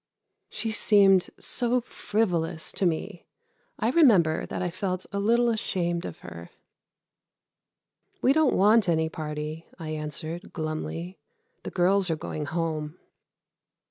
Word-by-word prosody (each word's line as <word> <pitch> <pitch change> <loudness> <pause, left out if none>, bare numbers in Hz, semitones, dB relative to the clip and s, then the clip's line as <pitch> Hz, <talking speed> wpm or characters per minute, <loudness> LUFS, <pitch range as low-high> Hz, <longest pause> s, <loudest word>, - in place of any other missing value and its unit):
She 225 - -3
seemed 200 -4 +4
so 245 0 +2
frivolous 180 -9 -1
to 190 - +1
me. 160 -2 -4 0.5
I 225 - 0
remember 200 - +4
that - - -4
I 175 - -2
felt 185 0 -3
a 200 - -2
little 235 +4 +3
ashamed 175 -6 -1
of 85 - -8
her. 85 0 -10 1.7
"We 265 - +3
don't 310 -3 +3
want 210 0 +4
any 160 -1 +1
party," 155 +1 -6
I 160 -4 -7
answered, 155 +2 -5
glumly. 165 +3 -5 0.4
"The - - -6
girls 190 +1 +3
are 160 - +1
going 155 -1 -5
home." 155 0 -3
175 Hz, 125 wpm, -26 LUFS, 160-210 Hz, 1.7 s, seemed